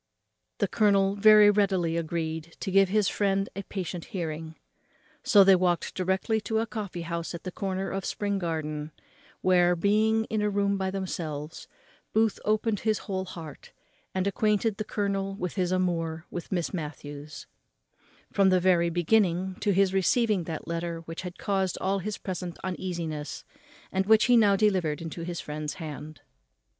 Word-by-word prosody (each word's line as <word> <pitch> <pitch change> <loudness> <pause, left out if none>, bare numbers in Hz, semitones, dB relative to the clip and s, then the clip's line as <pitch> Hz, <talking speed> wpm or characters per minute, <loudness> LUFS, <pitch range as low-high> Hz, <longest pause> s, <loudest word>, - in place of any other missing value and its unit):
The - - +1
colonel 200 -2 +3
very 210 0 +7
readily 190 -5 +1
agreed 165 -1 -3
to 190 - -3
give 195 0 +5
his 210 0 +2
friend 195 -1 +1
a 200 - -3
patient 185 -3 -5
hearing. 160 -3 -5 0.7
So 205 -3 +6
they 195 0 +7
walked 180 -1 0
directly 190 +4 0
to 220 +2 -1
a 225 - +1
coffee 205 -7 -5
house 170 0 -4
at 170 - -8
the 185 - -5
corner 190 0 -3
of 195 0 -3
Spring 200 +1 -2
Garden, 155 -3 -3 0.5
where, 180 -1 +4
being 215 +4 +2
in 220 -1 -2
a 210 - +1
room 200 0 +1
by 190 -1 -1
themselves, 165 -5 -5 0.5
Booth 220 -1 +2
opened 215 0 +1
his 215 -1 +1
whole 190 -2 -2
heart, 160 -5 -10 0.4
and 185 0 0
acquainted 210 +1 +1
the 215 - -2
colonel 195 -2 -2
with 180 -3 -4
his 180 -2 0
amour 165 -3 -1
with 175 - -6
Miss 175 -1 -1
Matthews, 145 -3 -7 0.9
from 195 -1 +4
the 185 -1 +4
very 175 -2 +3
beginning 180 +1 +2
to 205 - +1
his 195 0 +3
receiving 195 -1 +2
that 160 -2 -6
letter 170 0 -3
which 165 0 -7
had 180 -1 -7
caused 190 -2 -1
all 195 +1 0
his 205 +3 -4
present 180 -2 -5
uneasiness, 170 -5 -4 0.5
and 190 0 0
which 220 0 +6
he 245 - +5
now 210 -4 +5
delivered 185 -8 +1
into 165 +1 -6
his 170 0 -4
friend's 150 0 -5
hand. 155 -2 -8
185 Hz, 165 wpm, -27 LUFS, 170-200 Hz, 0.9 s, very